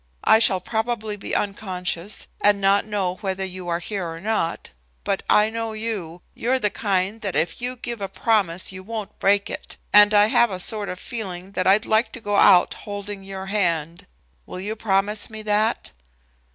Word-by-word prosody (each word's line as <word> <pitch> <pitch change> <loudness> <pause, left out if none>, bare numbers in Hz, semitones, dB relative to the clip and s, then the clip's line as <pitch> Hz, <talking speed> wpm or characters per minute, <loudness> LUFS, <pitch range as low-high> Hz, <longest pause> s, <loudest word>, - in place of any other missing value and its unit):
I 220 - +6
shall 190 -4 +4
probably 220 +1 -2
be 200 - -5
unconscious, 190 -2 -2 0.2
and 205 -1 +4
not 195 +1 +3
know 190 -4 -1
whether 190 -1 -2
you 185 -1 -7
are 170 -1 0
here 180 0 -4
or 165 0 -7
not, 200 -4 -2 0.3
but 195 -1 -1
I 210 +1 +4
know 225 0 -3
you. 205 -7 -5
You're 255 +3 0
the 210 -5 0
kind 200 +1 -1
that 195 -3 -3
if 165 +6 -1
you 250 +1 -3
give 235 -3 -6
a 195 - -2
promise 195 -7 0
you 185 0 -8
won't 215 +1 -7
break 200 +1 +3
it, - - -7 0.2
and 205 0 +8
I 205 0 +6
have 235 +2 +4
a 185 -2 -5
sort 210 +2 0
of 180 - -5
feeling 195 -6 -6
that 185 -2 -1
I'd 200 +3 +4
like 220 +1 +2
to - - -5
go 205 -2 -1
out 185 -3 +6
holding 205 -1 -7
your 195 0 -7
hand. 170 -5 -1 0.4
Will - - -7
you 210 +4 -3
promise 205 0 0
me 220 -1 -8
that?" 215 +2 0
205 Hz, 190 wpm, -23 LUFS, 185-220 Hz, 0.4 s, and